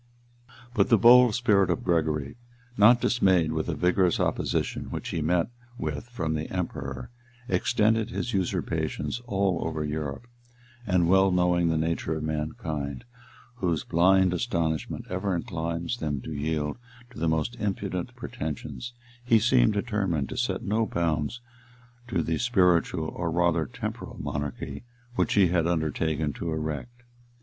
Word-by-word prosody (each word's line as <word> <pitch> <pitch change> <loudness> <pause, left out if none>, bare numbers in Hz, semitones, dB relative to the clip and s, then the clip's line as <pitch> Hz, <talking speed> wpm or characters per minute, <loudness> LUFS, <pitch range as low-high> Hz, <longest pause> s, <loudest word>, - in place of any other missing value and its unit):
] 120 0 -22
But - - +2
the 115 - +6
bold 120 +1 +7
spirit 100 -6 +3
of 85 - 0
Gregory, 80 -5 0 0.4
not 120 +3 +6
dismayed 95 -9 +3
with 80 0 -2
the 85 - -1
vigorous 90 +2 +2
opposition - - -1
which - - -5
he 80 - -2
met 85 +4 +1 0.3
with 80 +9 -4
from 80 -10 -2
the 80 0 -3
emperor, 70 - -4 0.4
extended 110 +4 +2
his 120 0 -3
usurpations 95 +5 -2
all 95 -5 +1
over 80 -1 -2
Europe; 75 +5 -4 0.6
and 90 -3 +3
well 95 +2 +5
knowing 90 -1 +2
the 80 - +1
nature 80 0 -1
of 80 - -4
mankind, 75 - -3 0.5
whose 85 - 0
blind 95 +2 +4
astonishment 85 - -2
ever 95 +1 -1
inclines 85 +1 -3
them 75 - -2
to 80 - -6
yield 75 +3 -2 0.3
to 120 - -10
the 80 0 +1
most 80 +9 0
impudent 100 -4 -3
pretensions, 80 - -6 0.3
he 120 -2 +5
seemed 100 - +4
determined 100 - -1
to - - -5
set - - -1
no 110 +2 +1
bounds 80 +6 -1 0.7
to 90 -8 0
the 80 +1 -1
spiritual, 90 -8 +2
or 85 -1 -3
rather 85 -2 +1
temporal - - -6
monarchy 70 - -4 0.3
which - - +1
he 95 -4 +5
had 85 -2 +2
undertaken 80 -2 0
to 85 - -4
erect. 80 +11 -4
85 Hz, 145 wpm, -27 LUFS, 80-100 Hz, 0.7 s, bold